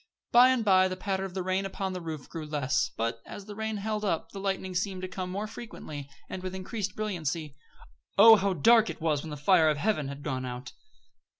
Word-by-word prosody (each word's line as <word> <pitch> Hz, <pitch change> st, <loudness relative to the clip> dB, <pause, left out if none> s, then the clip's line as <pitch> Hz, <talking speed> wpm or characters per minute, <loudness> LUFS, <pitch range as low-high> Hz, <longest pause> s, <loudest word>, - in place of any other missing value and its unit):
By 245 Hz, +2 st, +8 dB
and 255 Hz, -4 st, +1 dB
by 185 Hz, -2 st, +5 dB
the 185 Hz, -, -3 dB
patter 195 Hz, 0 st, -2 dB
of 190 Hz, -1 st, -8 dB
the 190 Hz, -, -2 dB
rain 185 Hz, +1 st, 0 dB
upon 195 Hz, 0 st, -3 dB
the 180 Hz, -, -5 dB
roof 160 Hz, -4 st, -6 dB
grew 160 Hz, -2 st, -7 dB
less; 140 Hz, -2 st, 0 dB
but, 115 Hz, 0 st, -2 dB
as 200 Hz, -, -9 dB
the 210 Hz, -, -8 dB
rain 220 Hz, 0 st, -3 dB
held 215 Hz, +1 st, -2 dB
up, 170 Hz, -6 st, -1 dB
the 200 Hz, -, -7 dB
lightning 195 Hz, -1 st, -2 dB
seemed 185 Hz, 0 st, -2 dB
to -, -, -2 dB
come 185 Hz, 0 st, -5 dB
more 200 Hz, +3 st, -3 dB
frequently 155 Hz, -11 st, -8 dB, 0.2 s
and 185 Hz, -, -6 dB
with 185 Hz, 0 st, -5 dB
increased 195 Hz, +1 st, -4 dB
brilliancy. 165 Hz, -8 st, -3 dB, 0.6 s
Oh, 225 Hz, +2 st, +10 dB
how 195 Hz, -1 st, +1 dB
dark 225 Hz, +7 st, +5 dB
it -, -, -6 dB
was 155 Hz, -3 st, 0 dB
when 160 Hz, -, -8 dB
the 150 Hz, -, -6 dB
fire 160 Hz, +2 st, +4 dB
of 150 Hz, -, +1 dB
heaven 155 Hz, -4 st, 0 dB
had 140 Hz, +1 st, -7 dB
gone 130 Hz, -3 st, -2 dB
out! 125 Hz, +1 st, -6 dB
185 Hz, 225 wpm, -29 LUFS, 155-200 Hz, 0.6 s, Oh